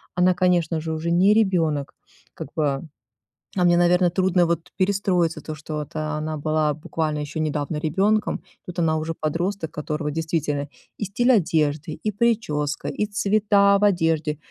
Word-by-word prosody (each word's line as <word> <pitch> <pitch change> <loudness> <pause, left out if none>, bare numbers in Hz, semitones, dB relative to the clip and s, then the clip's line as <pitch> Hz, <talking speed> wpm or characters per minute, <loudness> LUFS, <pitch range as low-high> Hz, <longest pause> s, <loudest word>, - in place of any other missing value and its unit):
она, 180 +1 +4
конечно 175 -3 +1
же, 160 +1 -4
уже 160 +2 -2
не 185 +4 +5
ребёнок. 165 -10 +1 0.4
Как - - -7
бы, 140 -3 0 0.8
а 180 - +3
мне, 175 0 +5
наверно, 175 +1 +4
трудно 185 0 +2
вот 170 0 -2
перестроиться 185 -4 +1
то, 155 - -6
что 155 +1 -7
вот 150 -1 -6
она 155 0 -3
была 155 0 +1
буквально 155 0 -3
ещё 150 +1 -5
недавно 150 0 -2
ребёнком. 195 +8 +1 0.3
Тут 180 0 -6
она 160 -2 +2
уже 160 +1 -3
подросток, 170 +2 -2
которого 150 0 -3
действительно 155 -2 -2 0.3
и 210 - -1
стиль 240 +6 +2
одежды, 155 - +1
и 215 - +1
причёска, 205 -10 0
и 210 - -1
цвета 200 -1 +3
в 200 - -1
одежде- 165 -6 +1
165 Hz, 155 wpm, -23 LUFS, 155-190 Hz, 0.8 s, не